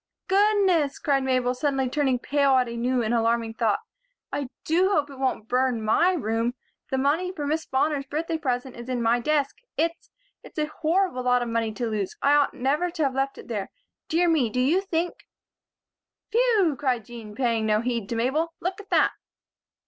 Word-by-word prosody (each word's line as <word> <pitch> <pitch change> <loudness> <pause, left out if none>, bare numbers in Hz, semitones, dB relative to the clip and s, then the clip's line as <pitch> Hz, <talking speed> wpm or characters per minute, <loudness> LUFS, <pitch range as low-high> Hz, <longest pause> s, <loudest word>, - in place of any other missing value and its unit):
"Goodness!" 385 -7 +3
cried 275 -2 +1
Mabel, 255 -1 +1
suddenly 270 0 0
turning 265 -1 +1
pale 280 +1 +2
at 255 -1 +3
a 235 - -5
new 245 +1 0
and 220 +1 0
alarming 230 -1 +1
thought. 220 -3 +1 0.6
"I 280 -2 -2 0.2
do 360 +4 +3
hope 295 -7 +1
it 270 - -11
won't 255 -5 -1
burn 250 -2 +1
my 340 +12 +3
room. 230 - -1 0.3
The 265 - 0
money 305 +7 +1
for 300 -6 -5
Miss 310 +3 -1
Bonner's 275 +1 0
birthday 320 +3 -2
present 255 -3 -2
is 235 +1 -9
in 245 -2 -1
my 230 +1 +3
desk. 290 - 0 0.2
It's 335 +1 -1 0.3
it's - - -15
a 305 - +1 0.2
horrible 335 -4 +1
lot 250 0 +2
of 240 - -4
money 230 -1 0
to 240 +3 -3
lose. 215 -4 -3
I 285 - +3
ought 290 -1 +3
never 290 +7 0
to 330 -2 -2
have 270 -2 +1
left 270 +1 -1
it - - -11
there. 210 -5 -3 0.4
Dear 345 +2 +2
me! 305 -9 +3
Do 250 - -2
you 305 +9 +3
think 350 -3 -3 0.5
" - - -63
"Phew!" 440 - +3
cried 255 -6 0
Jean, 230 -3 -10
paying 230 -3 0
no 215 0 +2
heed 235 -4 -2
to 235 - -2
Mabel. 300 +8 0
"Look 370 +3 -3
at 400 - -20
that!" - - +4
270 Hz, 195 wpm, -25 LUFS, 240-320 Hz, 0.6 s, that